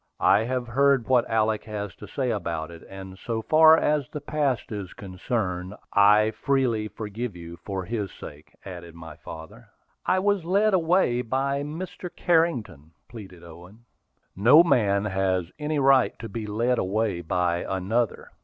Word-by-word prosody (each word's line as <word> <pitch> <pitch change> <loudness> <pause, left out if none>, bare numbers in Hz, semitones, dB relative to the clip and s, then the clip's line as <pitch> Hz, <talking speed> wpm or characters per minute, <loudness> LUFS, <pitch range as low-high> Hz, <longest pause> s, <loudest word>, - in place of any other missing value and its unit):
"I - - +6
have 125 0 -2
heard 135 0 +2
what 125 -2 +2
Alick 110 -1 +1
has 105 -2 -5
to 105 - -10
say 130 +3 -2
about 85 -6 -3
it; 85 -1 -12
and 95 -1 -10
so 115 -2 -4
far 160 +5 +6
as 150 -4 0
the 150 - -6
past 140 -6 -2
is 100 -4 -6
concerned, 95 -1 -4 0.2
I 105 +2 +5
freely 120 -5 0
forgive 110 0 -6
you 85 0 -10
for 95 -1 -5
his 105 -1 -3
sake," 75 +1 -12
added 85 -3 -9
my 80 -2 -10
father. 80 -6 -11 0.4
"I 185 - +3
was 200 -1 +1
led 200 +5 +2
away 165 -8 +2
by 135 +3 -1
Mr. 170 +4 -6
Carrington," 120 - 0 0.2
pleaded 95 -8 -11
Owen. 90 +7 -14 0.5
"No 125 - +7
man 105 -10 +2
has 95 -3 -1
any 150 0 -2
right 135 -2 +3
to 115 - -7
be 110 -2 -6
led 115 +4 0
away 100 -1 -1
by 85 +1 0
another. 95 +6 -2
110 Hz, 155 wpm, -25 LUFS, 95-135 Hz, 0.5 s, No